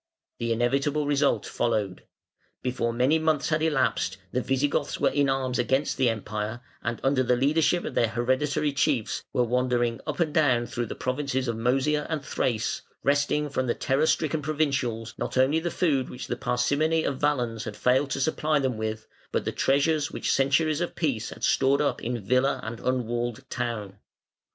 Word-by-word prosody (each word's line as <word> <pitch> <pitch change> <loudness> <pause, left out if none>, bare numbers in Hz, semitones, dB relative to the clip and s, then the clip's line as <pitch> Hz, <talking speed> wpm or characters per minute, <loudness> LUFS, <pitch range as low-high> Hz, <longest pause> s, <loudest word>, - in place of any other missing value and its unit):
The 115 -1 -1
inevitable 140 +6 +1
result 145 0 +2
followed. 105 -5 -1 0.6
Before 125 -2 -1
many 130 +7 +2
months 155 -2 +1
had 155 -1 +1
elapsed 130 - +1
the 125 - 0
Visigoths 140 +2 0
were - - +3
in 140 -1 +2
arms 130 -2 0
against 135 +4 +1
the 130 -3 +3
Empire, 110 +1 -3 0.2
and 120 0 -3
under 135 -1 +3
the 125 -1 +2
leadership 155 +7 +2
of - - -4
their 115 - +3
hereditary 130 +5 0
chiefs 140 -5 0
were 125 - +2
wandering 120 -1 0
up - - -3
and 160 -3 +1
down 130 -7 +3
through 120 0 -3
the - - -6
provinces 130 0 -2
of 115 - -1
Mœsia 135 +6 +1
and 155 -3 -3
Thrace, 120 -4 -1 0.2
wresting 145 +1 +2
from 130 -2 -2
the 120 - +1
terror 140 +4 +1
stricken 155 -1 +1
provincials 135 -7 -1
not - - -3
only 135 +5 +4
the 170 +1 -2
food 145 -7 +1
which 125 - -7
the - - -3
parsimony 145 +7 +1
of 135 -2 -2
Valens 120 -7 0
had - - -6
failed 130 +3 +2
to 135 - -2
supply 155 +1 +1
them 130 -5 0
with, 110 0 -3 0.3
but - - -1
the - - -1
treasures 145 +2 +2
which - - -1
centuries 150 +4 +2
of 175 - -3
peace 135 -10 -1
had - - -11
stored 135 +1 +3
up 150 - 0
in 120 -3 -3
villa 130 +4 +2
and 115 +1 -5
unwalled 120 0 -2
town. 110 -6 -4
130 Hz, 180 wpm, -26 LUFS, 120-145 Hz, 0.6 s, only